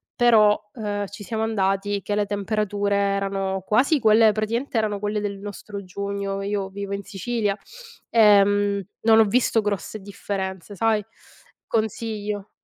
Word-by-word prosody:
Però, 215 -4 +5
uhm, 205 -3 -3
ci 205 +1 -10
siamo 220 +1 -3
andati 200 -1 0
che 205 - -2
le 205 0 +1
temperature 205 0 -1
erano 195 -1 -1
quasi 265 - +3
quelle 220 -1 +5
praticamente 230 +5 -2
erano 210 -2 -1
quelle 210 +1 -2
del 200 -1 -3
nostro 200 0 -8
giugno. 200 +1 -4
Io 200 -1 -2
vivo 200 0 -5
in 200 - -6
Sicilia, 205 +1 -2 0.5
ehm, 205 -2 +4 0.2
non 225 0 +5
ho - - +8
visto 225 +1 +2
grosse 205 +1 -3
differenze, 195 -1 -5
sai? 220 -1 +1 0.6
Consiglio. 215 -2 -2
205 Hz, 140 wpm, -23 LUFS, 200-215 Hz, 0.6 s, ho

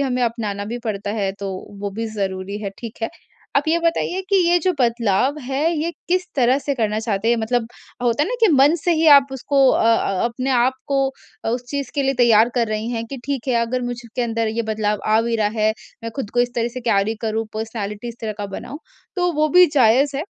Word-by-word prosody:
हमें 250 -1 -1
अपनाना 215 -4 -2
भी 245 - -3
पड़ता 205 -2 -3
है 200 -3 -1
तो 200 -1 -3 0.3
वो 205 - -3
भी 225 +3 -4
ज़रूरी 195 0 -3
है 200 - -3
ठीक 230 -2 -8
है। 225 - 0 0.5
आप 290 +3 +2
ये 335 - +3
बताइए 335 +2 0
कि 395 - +3
ये 350 - +4
जो 365 +2 +1
बदलाव 235 +3 +1
है, 275 +6 0
ये 325 +3 -1 0.2
किस 365 +1 +1
तरह 255 +1 +3
से 285 0 -2
करना 215 -3 0
चाहते 220 -1 -1
हैं 235 - +3
मतलब 230 +1 0 0.4
होता 245 +3 +2
है - - -1
ना - - -2
कि 450 - +6
मन 280 +4 +5
से 350 - +3
ही 320 0 +2
आप 275 0 +3
उसको 270 +1 +2
अ - - +2
अ 210 -4 +2
अपने 255 +3 -2
आप 250 0 +3 0.2
को 275 -1 +1 0.5
उस 245 +1 -2
चीज़ 280 -1 -3
के 285 - +1
लिए 270 0 +1
तैयार 235 -2 +5
कर 235 -2 +2
रही 215 +2 -2
हैं 230 -1 -3
कि 275 - -4
ठीक 275 -2 -3
है 250 - +2
अगर 250 +2 -2
मुझ 245 0 -3 0.2
के 250 - +1
अंदर 230 -1 -1
ये 230 +1 -1
बदलाव 215 -1 -1
आ 215 +1 +4
भी 230 0 0
रहा 210 -1 +2
है, 215 0 +3 0.3
मैं 230 - -4
खुद 230 -6 -4
को 245 - +1
इस 245 0 0
तरह 235 0 0
से 255 - -4
कैरी 220 -2 +1
करूँ 220 0 -1
पर्सनैलिटी 220 0 -4
इस 235 - -8
तरह 220 -1 -3
का 205 - -3
बनाऊँ 235 +8 -7 0.4
तो 355 -1 +1
वो 305 0 +1
भी 360 +2 +7
जायज़ 270 +3 +4
है। 295 - -1
235 Hz, 240 wpm, -21 LUFS, 220-275 Hz, 0.5 s, भी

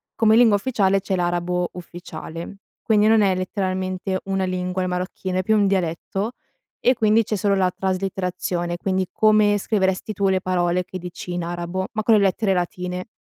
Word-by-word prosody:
come 220 -1 +4
lingua 230 -3 +6
ufficiale 200 -4 +1
c'è 190 0 -2
l'arabo 175 0 -1
ufficiale. 175 0 -8 0.3
Quindi 215 -1 +3
non 220 0 +5
è 195 -2 +3
letteralmente 185 0 -2
una 195 0 -1
lingua 185 0 -2
il - - -1
marocchino, 185 +1 -3
è - - 0
più 220 +3 +2
un 205 - +3
dialetto 195 +4 -1 0.5
e 250 - +4
quindi 220 -1 +3
c'è 215 - -2
solo 200 0 +1
la 185 -1 +2
traslitterazione, 180 -2 -2
quindi 190 0 -1
come 215 -1 +4
scriveresti 195 0 0
tu 195 0 +1
le 190 -1 +1
parole 180 -1 0
che 185 - -7
dici 180 0 -7
in 175 -1 -2
arabo, 175 +2 -3
ma 215 -1 -2
con 225 - +4
le 210 - +4
lettere 195 +1 +2
latine. 180 0 -3
190 Hz, 175 wpm, -22 LUFS, 180-205 Hz, 0.5 s, lingua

